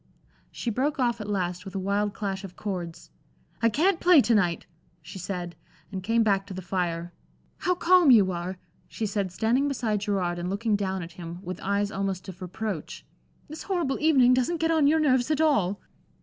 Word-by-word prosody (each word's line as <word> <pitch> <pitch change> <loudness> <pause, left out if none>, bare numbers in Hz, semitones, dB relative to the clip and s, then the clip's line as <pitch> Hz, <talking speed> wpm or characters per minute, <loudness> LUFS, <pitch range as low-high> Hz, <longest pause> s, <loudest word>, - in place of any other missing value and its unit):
She 235 - -4
broke 270 +7 0
off 240 -3 0
at 210 - -6
last, 180 -3 -2
with 195 - -9
a - - -1
wild 200 +2 -1
clash 195 -2 -3
of 190 -2 -9
chords. 175 -5 -6 0.5
"I 230 - +4
can't 340 - +2
play 355 -3 +6
to 240 - +2
night," 180 -6 +1 0.3
she 190 - -10
said, 180 -2 -5 0.4
and 190 -2 -4
came 225 +4 +2
back 200 -2 +1
to 195 - -7
the 185 - -5
fire. 175 -2 -2 0.4
"How 360 0 0
calm 355 -2 +5
you 205 -7 +6
are!" 180 +1 -4 0.3
she 225 - -4
said, 200 -2 -2
standing 235 +9 +1
beside 230 -7 -1
Gerard 190 -4 -1
and 175 +1 -3
looking 210 +2 0
down 190 -2 -2
at 165 - -9
him 170 0 -8
with 180 0 -6
eyes 200 +1 0
almost 195 -1 -3
of 190 0 -9
reproach. 185 -1 -5 0.4
"This 310 +2 -8
horrible 345 -8 -1
evening 270 -5 +5
doesn't 255 +7 +1
get 325 +1 +1
on 315 -3 +4
your 320 +2 +4
nerves 260 -4 +2
at 305 -1 +1
all." 215 - +2
205 Hz, 195 wpm, -26 LUFS, 185-255 Hz, 0.5 s, play